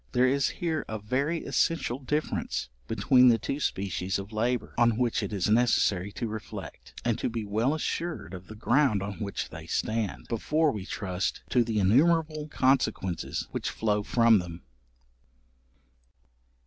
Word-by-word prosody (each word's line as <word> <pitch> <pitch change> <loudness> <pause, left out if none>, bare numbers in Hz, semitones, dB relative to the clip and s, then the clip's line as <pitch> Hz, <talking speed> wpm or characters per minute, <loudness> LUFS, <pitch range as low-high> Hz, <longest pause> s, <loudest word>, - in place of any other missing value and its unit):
There 125 +1 +4
is 135 +1 +2
here 160 -3 -1
a 110 - -3
very 135 +10 -1
essential 135 -1 0
difference 145 - -2 0.2
between 125 -1 +5
these 115 -2 +5
two 140 +7 -3
species 95 - -1
of 100 +2 -7
labour, 120 +3 -1
on 120 -2 +3
which 120 -2 +1
it - - -4
is 100 -4 0
necessary 105 -4 +2
to 120 - -3
reflect, 110 -1 -8
and 120 -2 +1
to - - -1
be 115 -2 -4
well 110 +8 +1
assured 155 - -3
of 90 0 -9
the 110 - -9
ground 115 -2 +2
on 100 0 -6
which 100 -2 -4
they 80 +1 -9
stand, 110 +3 -2
before 150 +7 +1
we 100 -6 -6
trust 95 -1 -3
to 125 - +4
the 115 -2 -2
innumerable 155 - +3
consequences 130 - 0
which - - -2
flow 105 -1 0
from 115 0 +4
them. 85 -1 -8
115 Hz, 155 wpm, -28 LUFS, 100-135 Hz, 0.2 s, between